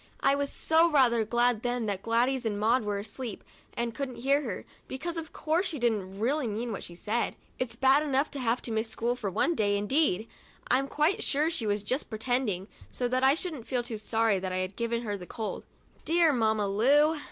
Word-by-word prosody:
I 275 Hz, -, +4 dB
was 280 Hz, 0 st, -3 dB, 0.2 s
rather 245 Hz, -6 st, +4 dB
glad 240 Hz, 0 st, +2 dB
then 245 Hz, -1 st, -1 dB
that 200 Hz, -2 st, -2 dB
Gladys 245 Hz, +4 st, +1 dB
and 210 Hz, -3 st, -2 dB
Maud 230 Hz, +3 st, +3 dB
were 205 Hz, -1 st, -2 dB
asleep 215 Hz, +2 st, -6 dB, 0.3 s
and 235 Hz, -1 st, -2 dB
couldn't 260 Hz, 0 st, -4 dB
hear 275 Hz, +5 st, +2 dB
her, 225 Hz, -10 st, -5 dB, 0.2 s
because, 330 Hz, +6 st, -4 dB
of 325 Hz, -1 st, -6 dB
course, 330 Hz, +5 st, 0 dB
she 320 Hz, -, -4 dB
didn't 210 Hz, -6 st, -1 dB
really 265 Hz, +4 st, +1 dB
mean 225 Hz, +3 st, -3 dB
what 205 Hz, -, -4 dB
she 170 Hz, -, -9 dB
said. 220 Hz, +6 st, -1 dB, 0.2 s
It's 255 Hz, -2 st, -2 dB
bad 270 Hz, +2 st, +4 dB
enough 285 Hz, -1 st, +1 dB
to 280 Hz, -, -5 dB
have 245 Hz, 0 st, 0 dB
to 235 Hz, -, -4 dB
miss 220 Hz, +1 st, 0 dB
school 235 Hz, +2 st, -1 dB
for 215 Hz, -5 st, -3 dB
one 265 Hz, -, +1 dB
day, 205 Hz, -6 st, +1 dB
indeed! 220 Hz, -, +1 dB, 0.4 s
I'm 270 Hz, +2 st, +3 dB
quite 305 Hz, +7 st, +1 dB
sure 305 Hz, +3 st, +1 dB
she 230 Hz, -9 st, -2 dB
was 205 Hz, 0 st, 0 dB
just 255 Hz, +8 st, -2 dB
pretending, 220 Hz, -4 st, -1 dB, 0.2 s
so 245 Hz, -, -2 dB
that 255 Hz, +1 st, 0 dB
I 270 Hz, +2 st, +6 dB
shouldn't 315 Hz, -8 st, -4 dB
feel 250 Hz, -2 st, -1 dB
too 230 Hz, -3 st, -5 dB
sorry 220 Hz, -2 st, +2 dB
that 185 Hz, 0 st, -4 dB
I 185 Hz, -, -1 dB
had 185 Hz, +1 st, -3 dB
given 235 Hz, 0 st, -2 dB
her 205 Hz, -3 st, -2 dB
the 180 Hz, -3 st, -9 dB
cold 220 Hz, -2 st, -5 dB, 0.2 s
— -, -, -32 dB
dear 330 Hz, -2 st, +3 dB
Mamma 220 Hz, -4 st, +1 dB
Lu! 290 Hz, +10 st, +3 dB
240 Hz, 215 wpm, -29 LUFS, 215-275 Hz, 0.4 s, I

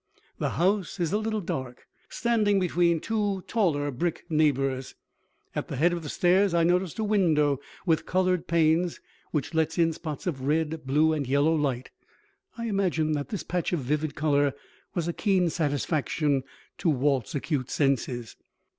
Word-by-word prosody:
The -, -, -2 dB
house 190 Hz, +1 st, +1 dB
is 170 Hz, 0 st, 0 dB
a 210 Hz, -, +2 dB
little 220 Hz, -1 st, -2 dB
dark, 130 Hz, -7 st, -5 dB, 0.2 s
standing 215 Hz, -4 st, +2 dB
between 170 Hz, -2 st, +2 dB
two 205 Hz, -1 st, -1 dB
taller 150 Hz, -10 st, +1 dB
brick 165 Hz, +7 st, -2 dB
neighbors. 135 Hz, -4 st, +1 dB, 0.6 s
At -, -, -3 dB
the -, -, -5 dB
head 170 Hz, +6 st, +3 dB
of 170 Hz, -, -3 dB
the 150 Hz, -, -6 dB
stairs 185 Hz, +1 st, +3 dB
I 170 Hz, -, +4 dB
noticed 180 Hz, 0 st, +1 dB
a 220 Hz, -, -1 dB
window 160 Hz, -10 st, +2 dB, 0.3 s
with 165 Hz, -3 st, +1 dB
colored 185 Hz, -2 st, +1 dB
panes, 170 Hz, +1 st, +2 dB, 0.3 s
which 150 Hz, +1 st, -2 dB
lets 160 Hz, +1 st, 0 dB
in 165 Hz, -1 st, +3 dB
spots 155 Hz, -2 st, -6 dB
of 150 Hz, -8 st, -2 dB
red, 155 Hz, +1 st, -1 dB
blue 155 Hz, +4 st, +3 dB
and 145 Hz, -4 st, -2 dB
yellow 140 Hz, +4 st, +3 dB
light. 135 Hz, -5 st, -1 dB, 0.7 s
I 235 Hz, -, -4 dB
imagine 185 Hz, -7 st, 0 dB
that 145 Hz, -2 st, -2 dB
this 205 Hz, -, -4 dB
patch 180 Hz, 0 st, -2 dB
of 170 Hz, -, 0 dB
vivid 150 Hz, +3 st, -1 dB
color 145 Hz, -2 st, +2 dB, 0.4 s
was 170 Hz, -2 st, -1 dB
a 170 Hz, -, -1 dB
keen 185 Hz, -4 st, +2 dB
satisfaction 145 Hz, -2 st, 0 dB, 0.3 s
to 170 Hz, -, +1 dB
Walt's 135 Hz, -5 st, +1 dB
acute 140 Hz, -3 st, -2 dB
senses. 125 Hz, -4 st, -1 dB
160 Hz, 165 wpm, -27 LUFS, 145-180 Hz, 0.7 s, I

